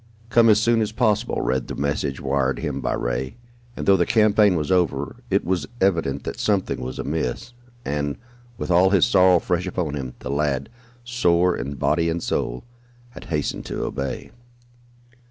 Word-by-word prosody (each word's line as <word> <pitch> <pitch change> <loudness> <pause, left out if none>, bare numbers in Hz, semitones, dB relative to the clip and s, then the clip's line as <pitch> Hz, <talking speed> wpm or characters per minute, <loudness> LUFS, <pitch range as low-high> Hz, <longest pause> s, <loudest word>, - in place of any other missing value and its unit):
"Come 115 -1 +5
as 105 -1 +6
soon 115 +1 +2
as 110 -1 -1
possible," 110 -1 +1
read 65 0 -1
the - - -5
message 70 -1 -2
wired 65 -1 0
him 70 -2 -3
by - - -1
Ray, - - -2 0.4
and, - - -4
though 100 -1 +5
the 85 - +1
campaign 105 -3 +4
was 75 +1 -2
over, 80 -6 0
it - - +1
was 90 0 -1
evident 80 -8 +1
that - - -5
something 95 - 0
was 65 +1 -5
amiss, 80 - -3 0.3
and, 70 0 -2 0.4
with - - -3
all 90 +2 +5
his 100 -1 +4
sorrow 95 -5 +5
fresh 90 +2 -1
upon 90 -5 -2
him, 65 -3 -5
the - - -6
lad, 70 -2 -1 0.3
sore 90 -8 +2
in 70 +1 -5
body 85 +5 +1
and 85 0 -2
soul, - - -2 0.5
had - - -11
hastened 75 -3 -2
to - - -3
obey. 70 -1 -4
85 Hz, 175 wpm, -23 LUFS, 70-100 Hz, 0.5 s, as